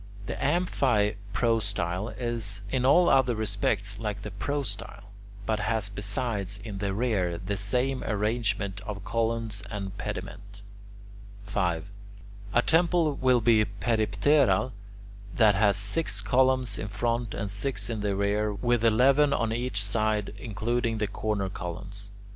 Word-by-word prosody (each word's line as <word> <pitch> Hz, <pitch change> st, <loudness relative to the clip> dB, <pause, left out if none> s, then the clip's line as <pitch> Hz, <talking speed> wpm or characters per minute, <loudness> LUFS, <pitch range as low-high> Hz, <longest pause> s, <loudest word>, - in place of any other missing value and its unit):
The -, -, -3 dB
amphiprostyle 105 Hz, -, 0 dB
is 115 Hz, -5 st, -2 dB
in 125 Hz, -1 st, +1 dB
all 175 Hz, +6 st, +6 dB
other 130 Hz, -3 st, +4 dB
respects 105 Hz, -1 st, -1 dB
like 105 Hz, -3 st, -4 dB
the 105 Hz, -, -5 dB
prostyle, 100 Hz, -2 st, -4 dB, 0.3 s
but 110 Hz, +1 st, 0 dB
has 110 Hz, -1 st, 0 dB
besides, 100 Hz, 0 st, -2 dB
in 100 Hz, -3 st, -5 dB
the 100 Hz, -1 st, -1 dB
rear, 95 Hz, -6 st, 0 dB
the 100 Hz, +3 st, -3 dB
same 125 Hz, +7 st, 0 dB
arrangement 105 Hz, -2 st, -1 dB
of 100 Hz, -2 st, -5 dB
columns 115 Hz, -2 st, -1 dB
and 100 Hz, -3 st, -5 dB
pediment. 100 Hz, 0 st, -6 dB, 0.8 s
5. 90 Hz, -5 st, -1 dB, 0.7 s
A 120 Hz, -, +4 dB
temple 165 Hz, -1 st, +3 dB
will 130 Hz, -3 st, +3 dB
be 110 Hz, -1 st, +5 dB
peripteral 120 Hz, +7 st, +2 dB, 0.6 s
that 110 Hz, -3 st, +5 dB
has 100 Hz, 0 st, +3 dB
six 105 Hz, +2 st, -1 dB
columns 125 Hz, +1 st, +2 dB
in -, -, -3 dB
front 115 Hz, +3 st, -1 dB
and 100 Hz, -2 st, -3 dB
six 105 Hz, +7 st, -3 dB
in 110 Hz, -3 st, -3 dB
the 100 Hz, -1 st, 0 dB
rear, 105 Hz, +2 st, +1 dB
with 120 Hz, +2 st, 0 dB
eleven 135 Hz, +6 st, +5 dB
on 115 Hz, -1 st, 0 dB
each 120 Hz, -4 st, -1 dB
side 105 Hz, 0 st, 0 dB
including 115 Hz, +1 st, -1 dB
the 105 Hz, -, 0 dB
corner 105 Hz, -1 st, -2 dB
columns. 100 Hz, +3 st, -7 dB
105 Hz, 130 wpm, -27 LUFS, 100-120 Hz, 0.8 s, all